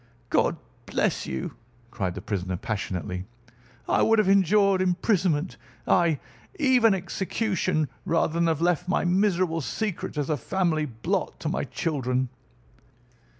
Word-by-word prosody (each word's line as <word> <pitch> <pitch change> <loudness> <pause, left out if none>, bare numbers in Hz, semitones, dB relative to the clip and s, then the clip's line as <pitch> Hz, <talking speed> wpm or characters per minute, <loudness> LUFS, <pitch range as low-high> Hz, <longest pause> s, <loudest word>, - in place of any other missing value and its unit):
"God - - +2 0.3
bless - - 0
you!" 65 0 -4 0.4
cried 95 -7 -2
the - - -7
prisoner 95 -3 -2
passionately. 90 -3 -4 0.6
"I - - +3
would 225 0 +4
have 215 -3 +3
endured 195 0 +4
imprisonment, 180 -3 +1 0.3
ay, 170 -4 +3 0.4
even 250 - +4
execution, 185 -3 -1 0.2
rather 165 -3 +1
than 170 0 +2
have 160 -1 0
left 175 0 +1
my 185 - +1
miserable 180 -3 +2
secret 195 +1 -3
as 145 -2 0
a 150 - +1
family 160 +1 0
blot 115 -3 -2
to - - -1
my - - -1
children. 130 -5 -1
170 Hz, 130 wpm, -26 LUFS, 135-190 Hz, 0.6 s, would